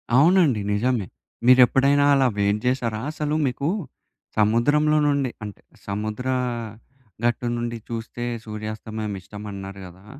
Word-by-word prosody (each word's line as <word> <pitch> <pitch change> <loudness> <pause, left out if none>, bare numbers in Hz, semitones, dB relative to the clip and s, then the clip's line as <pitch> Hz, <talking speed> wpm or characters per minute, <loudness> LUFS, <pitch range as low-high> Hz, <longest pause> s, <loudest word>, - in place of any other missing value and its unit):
అవునండి 150 - +5
నిజమే. 115 -2 0 0.4
మీరెప్పుడైనా 135 +3 +5
అలా 135 -2 +4
వెయిట్ 100 +1 +2
జేసారా? 120 -4 0
అసలు 150 -1 -2
మీకు, 140 +4 -1 0.7
సముద్రంలో 145 +8 +3
నుండి, 140 -4 +1
అంటే 105 -2 -8 0.3
సముద్ర 110 +5 -3 1.0
గట్టు 120 +1 0
నుండి 120 0 -3
చూస్తే 115 +1 -5 0.2
సూర్యాస్తమయం 110 0 -5
ఇష్టమన్నారు 100 0 -8
గదా! 95 +3 -14
120 Hz, 105 wpm, -23 LUFS, 105-135 Hz, 1.0 s, అవునండి